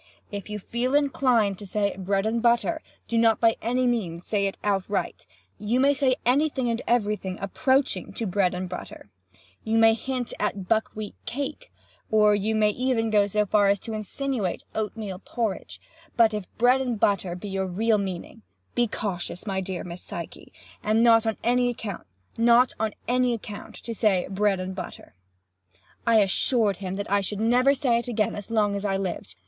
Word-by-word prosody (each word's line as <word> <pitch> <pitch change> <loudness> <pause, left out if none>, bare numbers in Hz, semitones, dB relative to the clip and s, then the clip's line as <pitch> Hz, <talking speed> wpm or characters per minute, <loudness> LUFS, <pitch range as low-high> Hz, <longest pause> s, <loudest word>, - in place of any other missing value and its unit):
If 205 0 -6
you 210 - -3
feel 240 +6 -1
inclined 250 -8 +2
to 205 - -8
say 200 +1 0
'bread 195 +1 -1
and 230 +1 0
butter,' 240 +7 +2 0.3
do 230 - +1
not 225 -1 +4
by 230 -1 +4
any 250 +3 +1
means 185 -9 -1
say 200 -2 +1
it 195 - -5
outright. 200 - -1 0.3
You 215 +5 0
may 280 +2 +5
say 265 -2 +2
any 280 +6 +3
thing 260 -4 -1
and 230 - -2
every 215 -3 +2
thing 190 -3 -6
approaching 260 +7 0
to 230 - -3
'bread 185 -2 +1
and 185 +1 -3
butter.' 175 - -9 0.5
You 225 +1 +1
may 225 0 +6
hint 250 +2 -3
at 200 -3 -2
buck 220 +1 +2
wheat 215 -1 -5
cake, 285 - -5 0.4
or 210 -1 +5
you 210 +2 0
may 210 -1 +3
even 240 -1 0
go 205 -1 +4
so 210 +1 +1
far 205 0 +3
as 200 0 +3
to 225 - -6
insinuate 215 -2 -3
oat 220 0 -3
meal 195 -4 -5
porridge, 220 -2 -4 0.4
but 225 -2 +5
if 210 -3 -5
bread 250 +3 +4
and 245 -4 -2
butter 190 -4 +1
be 200 +3 -7
your 190 0 -1
real 215 +4 +1
meaning, 185 - -5 0.3
be 240 0 +2
cautious, 185 -4 -4
my 195 -2 -1
dear 185 -1 -4
Miss 175 0 -7
Psyche, - - -8 0.3
not 225 +1 +4
on 220 - 0
any 245 +1 +3
account 215 -5 -7 1.7
to 230 - -6
say 205 -5 +2
'bread 195 0 +1
and 185 +1 -4
butter!'" 185 - -8 0.9
I 225 -2 +6
assured 205 +1 +2
him 190 -1 -4
that 200 0 -5
I 200 0 +3
should 200 +1 -4
never 250 +5 +4
say 250 -3 +2
it 235 - -7
again 215 -4 0
as 205 +1 -7
long 210 -3 +2
as 200 - -3
I 195 -2 0
lived. 180 - -4
215 Hz, 180 wpm, -25 LUFS, 195-235 Hz, 1.7 s, may